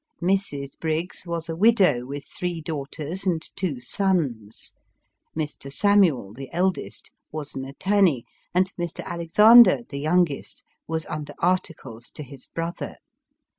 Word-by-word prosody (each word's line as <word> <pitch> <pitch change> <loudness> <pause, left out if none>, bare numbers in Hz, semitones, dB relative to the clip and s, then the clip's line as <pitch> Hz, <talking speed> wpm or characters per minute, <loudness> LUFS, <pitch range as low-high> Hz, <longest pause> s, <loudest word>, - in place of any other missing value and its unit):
Mrs. 175 -7 -1
Briggs 165 +3 -3
was 170 -1 -3
a 165 - -3
widow, 180 - +4
with 140 +1 -6
three 175 -2 -4
daughters 155 +3 -4
and 170 -3 +2 0.2
two 165 -9 -2
sons; 135 - -2 0.6
Mr. 150 -3 -4
Samuel, 175 - +3
the 135 +3 -9
eldest, 185 +1 -2 0.2
was 150 -2 -6
an 130 - -5
attorney, 175 - +2 0.3
and 185 +2 +1
Mr. 175 -2 -4
Alexander, 210 +10 +6
the 140 - -6
youngest, 155 -1 0 0.2
was 160 0 -2
under 155 -1 -6
articles 160 -10 -2
to 150 - -7
his 135 -1 -11
brother. 165 +1 -5
165 Hz, 130 wpm, -24 LUFS, 140-185 Hz, 0.6 s, Alexander